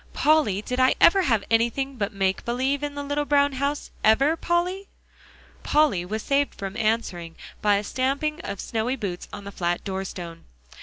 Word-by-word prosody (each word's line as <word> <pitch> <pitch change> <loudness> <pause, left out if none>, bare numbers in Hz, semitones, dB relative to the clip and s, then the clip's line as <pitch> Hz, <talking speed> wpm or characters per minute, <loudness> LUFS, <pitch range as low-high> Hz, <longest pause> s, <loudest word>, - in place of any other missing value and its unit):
"Polly, 290 -11 +2
did 250 +3 -3
I 255 0 +4
ever 385 +3 +6
have 230 - +1
anything 235 +4 +1
but 205 -4 -2
make 195 -1 -1
believe 260 +4 -1
in 290 -1 -4
the 285 - -4
little 290 +1 -1
brown 285 -1 +3
house; 280 +2 -2
ever, 275 +9 +4
Polly?" 355 +4 -1 0.7
Polly 290 - +2
was 215 +4 -4
saved 280 0 +1
from 195 0 -6
answering 215 -7 -1 0.3
by 205 -1 +4
a 200 - 0
stamping 280 +7 -1
of 200 - -6
snowy 230 +3 -2
boots 195 -8 -5
on 205 - -8
the 200 - -7
flat 175 -2 -2
doorstone. 185 -4 -6
250 Hz, 170 wpm, -25 LUFS, 200-285 Hz, 0.7 s, ever